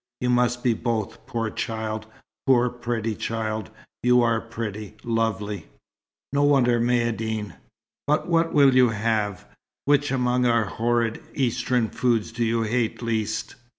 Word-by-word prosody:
You 125 0 +1
must 120 0 +2
be 120 - +3
both, 110 -2 -3
poor 115 -2 -2
child 110 -1 -3 0.4
poor, 125 -2 +4
pretty 115 -2 -2
child! 110 -3 -3 0.3
You 125 0 +4
are 115 -1 +2
pretty 110 -3 -6
lovely. 105 -5 -1 0.7
No 140 - +2
wonder 130 -5 +4
Maïeddine 115 -3 0 0.5
but 150 +1 +1
what 165 -1 +2
will 140 -2 +5
you 125 -1 +6
have. 105 -3 -1 0.4
Which 145 0 +3
among 125 -1 +1
our 115 -2 +3
horrid 115 +1 0
Eastern 125 -2 +1
foods 120 -4 0
do 115 +1 -2
you 115 0 +1
hate 115 +1 -1
least?" 110 0 -2
115 Hz, 135 wpm, -24 LUFS, 110-125 Hz, 0.7 s, you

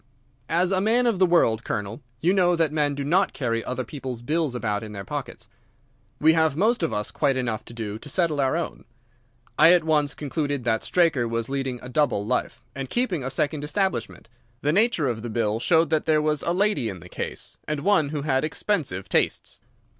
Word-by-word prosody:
As 175 +3 +2
a 190 -1 +2
man 235 +4 +3
of 230 -6 +1
the 185 - +5
world, 115 -10 +3
Colonel, 105 +6 -4 0.2
you 175 +4 +3
know 180 -2 +3
that 165 -3 +1
men 145 -2 0
do 140 - -3
not 180 +7 +2
carry 115 -4 -1
other 130 0 -3
people's 130 -4 -7
bills 150 -1 0
about 105 -4 -1
in 110 -1 -8
their 100 -1 -7
pockets. - - -6 0.7
We 160 +1 +5
have 160 -3 +2
most 220 +5 +2
of 165 - 0
us 105 0 -2
quite 140 -3 +1
enough 115 -4 -2
to - - -10
do 110 -2 -5
to 145 - -9
settle 155 -2 +1
our 135 +4 +1
own. 170 - -5 0.7
I 165 +3 +8
at 175 -2 +4
once 150 -2 +1
concluded 145 -2 -2
that 115 -2 0
Straker 160 -9 +2
was 115 +1 -2
leading 135 -2 -2
a - - -7
double 125 -7 +1
life, 120 0 -2
and 135 -2 -5
keeping 205 - 0
a 130 - -2
second 145 +3 -1
establishment. 150 - -2 0.4
The 150 +1 +2
nature 205 - +2
of 115 -3 -2
the 120 - -5
bill 110 -1 0
showed 165 +4 +3
that 155 0 +1
there 155 -1 +4
was 150 -1 0
a 170 - 0
lady 195 - +1
in 95 -3 -7
the - - -12
case, - - -6
and 150 -1 -2
one 185 -7 +3
who 145 -1 -3
had 135 -3 +1
expensive 155 - -2
tastes. - - 0
145 Hz, 210 wpm, -24 LUFS, 120-170 Hz, 0.7 s, I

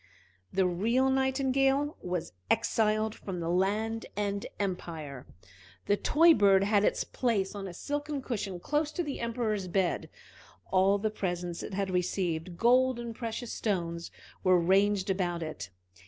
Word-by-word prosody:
The 190 0 +2
real 230 +9 +2
Nightingale 270 +2 +2
was 180 - -3 0.2
exiled 215 0 +2
from 190 -5 -6
the 165 0 -2
land 215 +5 0
and 200 -1 -1
empire. 160 -8 -4 0.6
The 205 - +3
toy 330 +10 +5
bird 195 -6 +5
had 205 0 +3
its - - +2
place 215 -7 -1
on 200 -1 -5
a 180 - -7
silken 290 - -3
cushion 200 -7 -3
close 295 - 0
to 350 - -1
the 290 -3 -4
Emperor's 225 -4 -1
bed. 180 0 0 0.6
All 195 +1 +4
the 215 +1 -1
presents 175 -4 -3
it - - -6
had 195 -1 -1
received, 180 -1 -1
gold 255 +3 +4
and 235 -1 -5
precious 230 +1 -5
stones, 170 -5 -2 0.3
were 185 -2 +5
ranged 195 +2 +3
about 175 -3 -1
it. 125 - -6
200 Hz, 145 wpm, -30 LUFS, 180-235 Hz, 0.6 s, toy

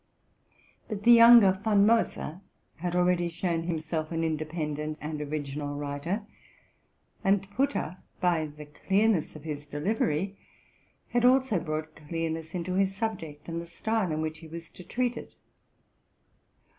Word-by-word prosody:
But 210 -2 -4
the 240 - +7
younger 230 -3 +9
Von 205 -2 +4
Moser 210 -6 +1 0.4
had 175 +2 -3
already 180 -1 +2
shown 170 0 -1
himself 160 -1 -2
an 165 0 -1
independent 155 -1 -2
and 150 0 -4
original 145 -1 -4
writer; 145 +8 -3 1.0
and 195 -1 +2
Putter, 225 - -1 0.2
by 170 -3 +2
the 150 0 -11
clearness 195 +4 +1
of 155 - -10
his 150 -2 -5
delivery, 185 +3 -1 0.7
had 240 -1 +1
also 255 -5 +4
brought 155 -1 -4
clearness 160 +1 -4
into 180 +1 -2
his 195 +1 +1
subject, 170 -9 -4
and 165 0 -3
the 170 - -9
style 215 +2 -1
in 155 0 -1
which 155 0 -4
he 160 - -11
was 165 +1 -9
to 180 - -12
treat 245 +6 -1
it. - - -9
170 Hz, 140 wpm, -28 LUFS, 155-200 Hz, 1.0 s, younger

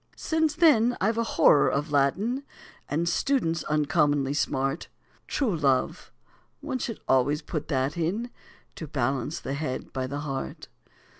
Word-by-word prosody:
Since 315 -2 0
then 245 -8 +4
I've 220 +4 +1
a - - +2
horror 150 -9 +4
of 145 +2 -2
Latin, 195 - +1 0.5
And 165 +4 0
students 170 - 0
uncommonly 145 -2 +1
smart; 135 +1 -1 0.4
True 240 -10 0
love, 135 -5 0 0.5
one 280 -3 -4
should 230 -2 -4
always 135 +3 +2
put 155 -3 -4
that 135 -1 0
in, 200 +9 -2 0.5
To 160 - -6
balance 135 +2 -1
the 135 - -4
head 140 -3 -4
by 130 -1 -2
the 140 +2 -4
heart. 135 -3 -5
150 Hz, 140 wpm, -27 LUFS, 140-225 Hz, 0.5 s, then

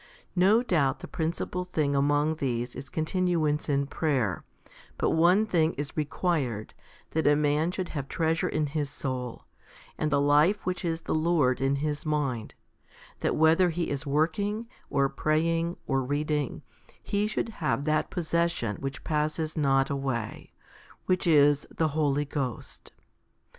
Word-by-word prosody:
No 200 +6 +4
doubt 150 - +1
the - - -7
principal 170 +2 -2
thing 155 -6 0
among 145 +3 +2
these 125 -4 -2
is 135 +2 -8
continuance 160 -2 0
in 140 -1 +2
prayer; 135 - -1 0.5
but - - +1
one 180 +6 +4
thing 165 -5 +2
is 145 0 -5
required, 150 - -1 0.4
that 160 -1 +1
a 145 - +6
man 150 +2 +2
should 180 0 -3
have 140 -4 -4
treasure 160 +1 0
in 155 -1 0
his 145 0 -2
soul, 125 -4 -5 0.5
and 155 - +1
the 140 -1 +2
life 150 +8 +3
which 180 0 -2
is 165 -1 -1
the - - -3
Lord 155 -6 +2
in 135 +1 +2
his 150 -1 -2
mind 140 -7 -2 0.6
that - - 0
whether 160 +3 +4
he 170 0 -2
is 145 +2 -3
working, 200 +10 0 0.2
or 140 -1 +2
praying, 165 +4 0
or 135 -1 +1
read 145 +4 -2
ing, 150 -3 -1 0.4
he 205 +1 0
should 215 +1 -2
have 150 -2 0
that 155 0 +1
possession 170 - -1
which 135 0 -5
passes 155 +1 -1
not 135 -3 +2
away, 130 -5 -3 0.5
which 185 -1 +1
is 145 -2 +4
the 160 -1 0
Holy 145 -1 +1
Ghost. 135 -5 -5
150 Hz, 150 wpm, -28 LUFS, 140-165 Hz, 0.6 s, a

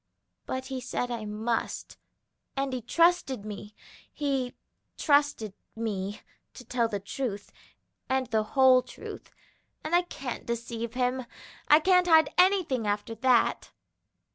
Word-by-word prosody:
But 260 0 -3
he 260 -1 -5
said 245 0 -3
I 230 -3 -4
must, 220 +2 -3 0.6
and 275 -1 -1
he 255 - -2
trusted 275 - +2
me, 210 0 -8 0.4
he 270 -4 -2 0.4
trusted 285 - +2 0.2
me 205 -3 -3 0.3
to 250 - -11
tell 235 0 +1
the 205 -2 -3
truth 200 0 -4 0.6
and 265 0 +1
the 220 -1 +3 0.2
whole 260 -1 +7
truth, - - -10 0.5
and 310 - -4
I 350 - +6
can't 275 -8 -7
deceive 235 0 -4
him; 250 0 0 0.4
I 300 - +7
can't 360 +2 +4
hide 320 -2 +5
anything 360 - +3
after 205 +2 -1
that." 245 +1 +2
250 Hz, 130 wpm, -28 LUFS, 225-275 Hz, 0.6 s, whole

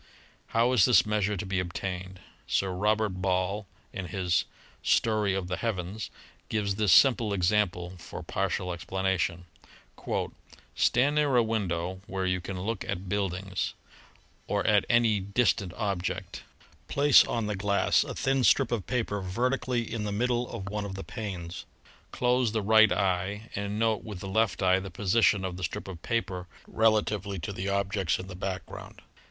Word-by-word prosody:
How 115 +2 +2
is 115 -7 +6
this 125 - +5
measure 105 -1 0
to 95 - -4
be 95 -1 -1
obtained? 90 +1 -5 0.3
Sir 95 -1 +1
Robert 105 +3 +1
Ball 95 +2 0 0.3
in 95 -2 -4
his 90 -3 0 0.4
"Story 105 -3 +2
of 95 -2 -2
the 90 0 -2
Heavens," 105 -1 -3 0.4
gives 105 -2 0
this 105 -1 +1
simple 115 +1 +5
example 90 -2 +1
for 85 - -8
partial 90 -1 -2
explanation: 90 0 -1 1.3
"Stand 130 +5 +3
near 145 -3 +2
a 120 - +5
window 95 -5 -2
where 95 0 -2
you 90 -1 0
can 95 +1 -5
look 110 +2 -2
at 95 -1 -4
buildings... 95 -1 -2 0.7
or - - 0
at 105 -2 +4
any 115 -3 +4
distant 100 -1 +1
object. 100 -5 -3 0.5
Place 145 -1 +6
on 115 -2 -2
the 105 0 -2
glass 100 +1 +2
a - - -6
thin 135 -1 +1
strip 120 - +4
of 115 -6 -2
paper 115 -5 -1
vertically 120 +5 0
in 110 -2 -2
the 105 - -2
middle 120 +3 0
of 100 -5 -6
one 105 0 -3
of 100 -1 -5
the 95 - -6
panes. 95 -7 -6 0.4
Close 125 -2 +1
the 110 -2 0
right 110 +1 +6
eye 100 +4 -1
and 100 +1 -3
note 110 -1 +1
with 105 -4 -7
the 95 - -7
left 100 -1 +1
eye 95 0 +4
the 95 +1 -7
position 100 +2 +2
of 90 -1 -4
the 90 - -6
strip 85 - -4
of 90 -4 -8
paper 95 -6 -2 0.2
rela 110 -1 +3
tively 100 -2 -4
to 100 - -5
the 95 +1 -3
objects 100 - 0
in 90 - -7
the 95 - -9
background. 95 0 -6
100 Hz, 165 wpm, -28 LUFS, 95-110 Hz, 1.3 s, is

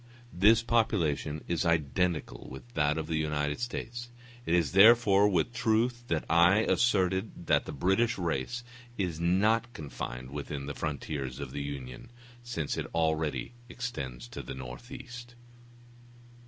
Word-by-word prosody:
This 110 +6 +5
population 85 -11 0
is 85 -2 0
identical 85 -4 0
with 120 - -11
that 75 -3 +1
of 80 - -2
the 80 0 -1
United 75 0 -1
States; 120 0 -5 0.4
it 85 - +3
is 85 -5 +2
therefore 105 0 +6
with 95 +5 +1
truth 120 +1 +1
that 80 -2 -1
I 85 +5 +5
asserted 95 -4 +1
that - - +3
the - - -5
British 95 - +1
race 85 - -2 0.3
is 90 -5 -2
not 105 +7 +2
confined 65 -4 -6
within 70 -1 -5
the 70 - -4
frontiers 70 -4 -4
of 70 -3 -6
the 70 - -4
Union, 70 - -7 0.3
since 115 -12 -3
it - - -3
already 80 - 0 0.2
extends 70 - -5
to - - -6
the 70 - -7
northeast. 120 - -9
85 Hz, 140 wpm, -30 LUFS, 75-115 Hz, 0.4 s, therefore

